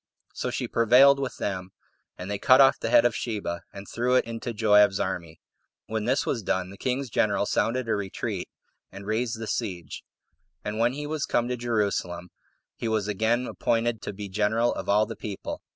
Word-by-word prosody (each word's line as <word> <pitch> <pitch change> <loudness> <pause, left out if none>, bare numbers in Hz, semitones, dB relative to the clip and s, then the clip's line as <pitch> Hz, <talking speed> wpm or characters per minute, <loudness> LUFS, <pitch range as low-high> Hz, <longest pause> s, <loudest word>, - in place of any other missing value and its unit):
So - - -3
she - - -3
prevailed 125 +5 +5
with 135 -2 -4
them, 95 -1 -4 0.4
and 90 +3 -6
they 100 - -2
cut 130 -1 +6
off 135 -1 +6
the - - -2
head 115 - +6
of 120 - +2
Sheba, 105 -7 -3
and 100 0 -10
threw 125 +2 0
it 130 - +3
into 115 +1 -5
Joab's 105 -3 +4
army. 85 -4 -4 0.5
When 110 -1 -3
this 130 +4 +1
was 120 - -1
done, 95 -1 -1
the 100 - -12
king's 130 +1 -1
general 100 -1 +1
sounded 120 +4 0
a - - +1
retreat, 100 -2 -3 0.4
and 100 +1 -10
raised 115 +2 -1
the 115 - -4
siege. 95 - -4 0.6
And 105 +1 -3
when 120 +2 +3
he 145 +2 -5
was 150 0 -2
come 120 - +1
to 125 - 0
Jerusalem, 100 -7 -2 0.4
he 115 - -4
was 110 -2 0
again 110 +4 +1
appointed 115 -2 -1
to - - -4
be 100 0 -7
general 105 +4 +1
of - - -6
all 105 +2 +4
the 115 +1 -7
people. 100 -3 -6
110 Hz, 195 wpm, -26 LUFS, 100-120 Hz, 0.6 s, cut